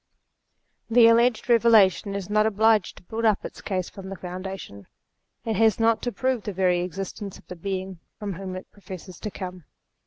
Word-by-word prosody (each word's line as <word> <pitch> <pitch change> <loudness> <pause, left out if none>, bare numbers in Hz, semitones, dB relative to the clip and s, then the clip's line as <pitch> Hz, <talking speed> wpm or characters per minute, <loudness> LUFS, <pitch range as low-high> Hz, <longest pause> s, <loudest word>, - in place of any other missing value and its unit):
The 235 0 +6
alleged 235 0 +4
Eeve 235 -2 +5
lation 200 -1 +4
is 195 -2 -4
not 215 +1 +3
obliged 220 -1 +2
to - - -14
build 220 +5 -5
up 215 -3 +2
its - - -8
case 185 -3 -2
from 190 -2 -9
the 195 - -5
foundation; 180 - -7 0.6
it 220 -3 -1
has 220 -1 +4
not 225 0 +3
to 245 - -2
prove 255 +2 -1
the 205 - -5
very 180 -1 +2
existence 195 +2 -5
of - - -19
the 180 - -8
Being 190 0 -4 0.2
from 205 -2 -4
whom 185 +1 -6
it 185 - -9
professes 185 -3 -10
to 215 - -4
come. 185 -2 -7
195 Hz, 190 wpm, -25 LUFS, 185-220 Hz, 0.6 s, The